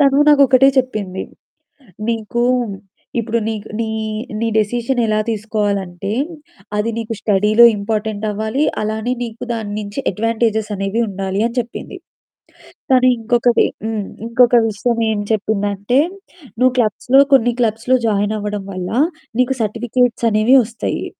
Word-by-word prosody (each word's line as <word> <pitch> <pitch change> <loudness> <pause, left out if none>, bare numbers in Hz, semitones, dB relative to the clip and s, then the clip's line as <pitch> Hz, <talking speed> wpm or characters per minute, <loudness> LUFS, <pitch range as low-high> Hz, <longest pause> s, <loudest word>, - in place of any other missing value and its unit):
తను 275 -1 +4
నాకు 290 -1 +6
ఒకటే 265 +1 +6
చెప్పింది, 205 -7 -2 0.9
"నీకు 230 +1 -2 0.8
ఇప్పుడు 230 0 -1
నీకు 220 -1 -4
నీ 230 - -1 0.5
నీ 230 - 0
డెసిషన్ 240 +4 0
ఎలా 215 0 +1
తీసుకోవాలంటే, 205 -4 -2 0.7
అది 210 +2 0
నీకు 225 0 -3
స్టడీ‌లో 210 +3 +4
ఇంపార్టెంట్ 215 0 -3
అవ్వాలి. 220 +7 -1 0.2
అలానే, 220 +3 -2
నీకు 230 -1 -7
దాన్నించి 210 0 -5
అడ్వాంటే‌‌జెస్ 220 +1 0
అనేవి 195 +3 -2
ఉండాలి" 195 0 -3
అని 235 0 -3
చెప్పింది. 235 0 -6 0.9
కానీ 255 -1 +5
ఇంకొకటి, 240 +1 +2 0.2
హ్మ్. 220 -2 -2 0.2
ఇంకొక 245 +1 +4
విషయం 230 +3 -1
ఏం 205 - -1
చెప్పిందంటే, 205 +2 0 0.6
"నువ్వు 255 +2 +4
క్లబ్స్‌లో 245 +4 +3
కొన్ని 245 -2 +4
క్లబ్స్‌లో 230 +3 +1
జాయిన్ 205 0 0
అవ్వడం 205 -1 -4
వల్ల, 185 -1 -4 0.5
నీకు 255 +1 +2
సర్టిఫికేట్స్ 235 +2 0
అనేవి 215 +5 +4
ఒస్తయి. 230 +1 -4
220 Hz, 120 wpm, -18 LUFS, 205-240 Hz, 0.9 s, నాకు